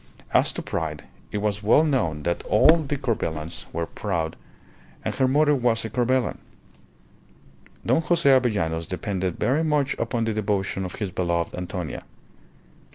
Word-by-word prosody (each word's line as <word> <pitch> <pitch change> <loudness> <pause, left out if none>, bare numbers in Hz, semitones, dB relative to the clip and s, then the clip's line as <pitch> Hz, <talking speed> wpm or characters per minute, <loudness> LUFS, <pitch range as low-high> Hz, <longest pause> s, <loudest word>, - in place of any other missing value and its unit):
As - - +4
to - - -5
pride, 75 -2 -3 0.3
it - - -2
was 105 0 -1
well 110 +9 +5
known 80 - 0
that 85 +2 -1
all 155 +10 +6
the 145 -3 -2
Corbelans 85 - -3
were 85 - -2
proud, 85 -4 -3 0.7
and - - -1
her 130 - +2
mother 150 +3 +4
was 120 -4 +1
a 110 - -5
Corbelan. 125 +1 +1 1.5
Don 160 - +3
Jose 170 -2 +1
Avellanos 105 -12 +2
depended 95 -1 -2
very 145 +6 +2
much 150 -3 +1
upon 115 0 -1
the 110 - 0
devotion 100 -2 -1
of 90 - -6
his 100 -4 -3
beloved 85 -2 -1
Antonia. 90 -2 -5
105 Hz, 150 wpm, -24 LUFS, 85-130 Hz, 1.5 s, all